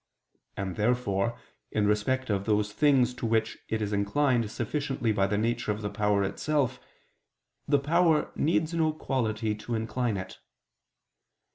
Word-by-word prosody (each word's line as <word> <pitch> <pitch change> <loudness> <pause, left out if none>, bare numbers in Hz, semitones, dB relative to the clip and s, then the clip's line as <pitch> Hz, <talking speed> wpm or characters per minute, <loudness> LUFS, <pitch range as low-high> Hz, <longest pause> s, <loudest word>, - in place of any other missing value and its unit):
And 95 -2 -3
therefore 115 -1 0 0.3
in 105 -1 +1
respect 110 +4 +1
of 100 -1 -1
those 105 -1 +1
things 135 -4 +3
to 120 -1 -3
which 110 0 0
it 110 -1 -1
is 105 0 -2
inclined 115 +3 +1
sufficiently 130 0 -2
by 100 -2 +2
the 105 +1 0
nature 115 +1 0
of 105 +1 -4
the 105 - -2
power 105 -1 +1
itself, 130 +4 0 0.9
the 145 - +4
power 160 +2 +2
needs 160 +1 +1
no 160 -2 +2
quality 110 -7 -1
to 110 +3 -4
incline 115 0 -1
it. 95 - -7
115 Hz, 145 wpm, -28 LUFS, 105-135 Hz, 0.9 s, the